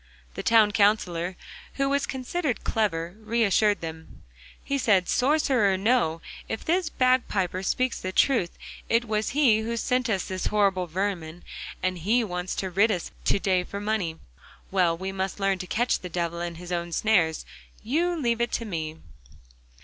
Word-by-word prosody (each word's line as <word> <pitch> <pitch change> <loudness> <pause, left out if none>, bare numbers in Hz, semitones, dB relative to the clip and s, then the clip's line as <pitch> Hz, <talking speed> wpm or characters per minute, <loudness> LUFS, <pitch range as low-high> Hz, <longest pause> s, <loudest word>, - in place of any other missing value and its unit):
The - - -5
Town 220 -2 +5
Counsellor, 190 -5 +1 0.4
who 275 0 +1
was 280 0 0
considered 265 - -2
clever, 175 -6 -1
reassured 215 -2 +2
them. 160 -1 -9 0.4
He 280 0 -1
said: 200 -8 +3
'Sorcerer 260 -6 +3
or - - 0
no, 190 -6 +1 0.3
if 220 - -4
this 345 0 +1
bagpiper 240 - +1
speaks 255 +6 -1
the 185 - -3
truth, 210 -4 +2 0.3
it 230 +1 +2
was 215 -1 -1
he 240 -8 +5
who 230 +1 -3
sent 250 +1 0
us 195 -4 0
this 185 -1 -3
horrible 195 -4 +2
vermin 175 -2 -3 0.4
that 185 0 0
he 220 +8 +2
wants 180 -3 -3
to 190 -1 -3
rid 200 +5 +4
us 180 -5 -2
of - - -28
to - - +3
day 185 -2 +1
for 200 +3 -6
money. 205 -6 -1 0.5
Well, 180 -3 +2
we 190 +2 -4
must 190 +1 -3
learn 195 -1 +1
to 185 - -6
catch 240 +6 +1
the 180 - -7
devil 170 0 -2
in 175 -1 -4
his 175 +1 -9
own 170 -1 -2
snares. 170 -5 +2 0.4
You 335 +9 0
leave 235 -4 0
it 235 - 0
to 230 - -1
me. 160 -5 -4
200 Hz, 170 wpm, -26 LUFS, 180-235 Hz, 0.5 s, Town